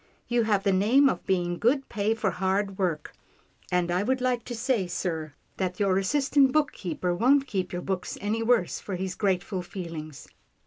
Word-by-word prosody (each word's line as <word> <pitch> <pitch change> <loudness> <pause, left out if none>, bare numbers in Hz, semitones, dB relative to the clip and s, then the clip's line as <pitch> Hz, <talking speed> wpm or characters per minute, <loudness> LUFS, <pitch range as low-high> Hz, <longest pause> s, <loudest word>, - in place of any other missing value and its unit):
You 240 -1 +1
have 205 -3 +1
the 200 - +3
name 235 +9 +5
of 180 - -4
being 175 -2 0
good 265 +4 +2
pay 215 +2 0
for 215 -3 0
hard 195 +1 -1
work, 165 -6 -1 0.6
and 180 -1 +1
I 180 +2 +1
would 260 +5 0
like 250 -1 0
to 240 - -5
say, 225 -5 0
sir, 160 -4 -3 0.2
that 185 0 -2
your 195 -2 +2
assistant 275 +5 +3
bookkeeper 185 - -1
won't 270 +9 +3
keep 190 -7 -3
your 175 0 -4
books 190 -2 -3
any 215 +3 -1
worse 225 -6 +2
for 195 - -5
his 185 0 -3
grateful 190 -2 -1
feelings. 165 -5 -7
195 Hz, 180 wpm, -27 LUFS, 180-235 Hz, 0.6 s, name